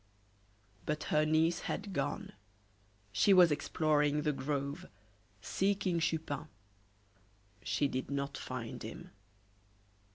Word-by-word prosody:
But 150 0 -1
her 155 0 +4
niece 160 +2 +3
had 200 -1 -3
gone. 140 -4 -2 0.8
She 195 - +5
was 175 -3 +7
exploring 150 0 +2
the 150 - +2
grove, 140 +1 -3 0.5
seeking 190 - +1
Chupin. 160 -3 -1 1.1
She 105 +7 +1
did 130 -1 -3
not 140 0 -2
find 125 -3 -5
him. - - -8
150 Hz, 100 wpm, -33 LUFS, 140-165 Hz, 1.1 s, was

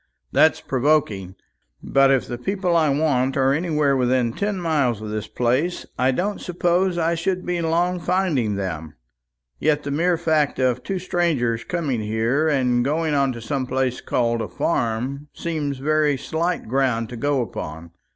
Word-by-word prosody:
"That's - - +4
provoking. 125 -9 0 0.5
But 135 0 +4
if 135 -2 +3
the 120 -1 -5
people 185 +3 -1
I 160 -2 +4
want 135 -3 +1
are 135 0 +3
anywhere 150 -3 +1
within 125 -2 +1
ten 200 - -2
miles 145 - +1
of 110 0 -6
this 105 0 -3
place, 130 +9 0
I 130 +1 +2
don't 190 +10 -1
suppose 175 +1 +1
I 165 0 +1
should 180 +2 -2
be 175 -1 -1
long 175 +2 +1
finding 165 - 0
them. 80 -6 -4 0.6
Yet 150 -1 +1
the 140 - -4
mere 170 +4 +2
fact 155 -3 +1
of 125 -1 +1
two 195 - -3
strangers 160 -11 0
coming 150 -10 -2
here, 115 +8 0
and 125 -5 +2
going 155 +3 0
on 140 -2 +2
to 120 - -8
some 130 +3 -2
place 130 -1 -1
called 115 -1 0
a - - -3
farm, 130 +2 -2
seems 150 -5 -3
very 150 +1 +1
slight 170 +4 -2
ground 125 -2 +1
to 125 - -7
go 140 +3 0
upon. 80 -5 -7
140 Hz, 165 wpm, -22 LUFS, 120-165 Hz, 0.6 s, That's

